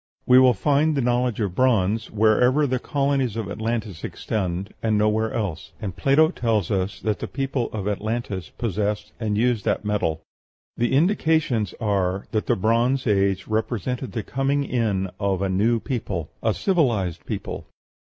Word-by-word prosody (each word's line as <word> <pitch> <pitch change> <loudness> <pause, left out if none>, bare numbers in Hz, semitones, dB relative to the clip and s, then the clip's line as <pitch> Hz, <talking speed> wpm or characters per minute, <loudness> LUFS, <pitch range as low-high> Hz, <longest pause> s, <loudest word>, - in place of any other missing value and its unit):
We 125 +1 +7
will 130 -2 +6
find 150 +1 +2
the - - +2
knowledge 120 -1 +1
of 100 -4 -1
bronze 110 -2 +2
wherever 125 +7 +3
the 130 -2 0
colonies 135 -4 0
of 110 -3 -3
Atlantis 110 -4 -3
extended, 95 -1 -3
and 110 -2 +1
nowhere 110 +1 +1
else; 85 -6 -4
and 95 -4 -5
Plato 155 +4 +4
tells 110 - 0
us 95 0 -1
that 105 -2 -1
the - - -4
people 135 -3 -2
of 105 -2 -4
Atlantis 105 -4 -3
possessed 105 -2 -2
and 105 -3 -1
used 120 -2 +1
that - - 0
metal. 80 -7 -1 0.5
The 120 +1 0
indications 155 - +2
are 100 -3 0
that 110 -2 -1
the - - +3
Bronze 120 +6 +1
Age 100 -3 +1
represents 110 +2 -2
the 110 -3 -4
coming 135 +4 0
in 105 -8 -1
of 100 -2 0
a 95 - 0
new 110 +5 +2
people 125 -2 -4
a - - +1
civilized 120 - +1
people. - - -5
110 Hz, 160 wpm, -23 LUFS, 100-125 Hz, 0.5 s, We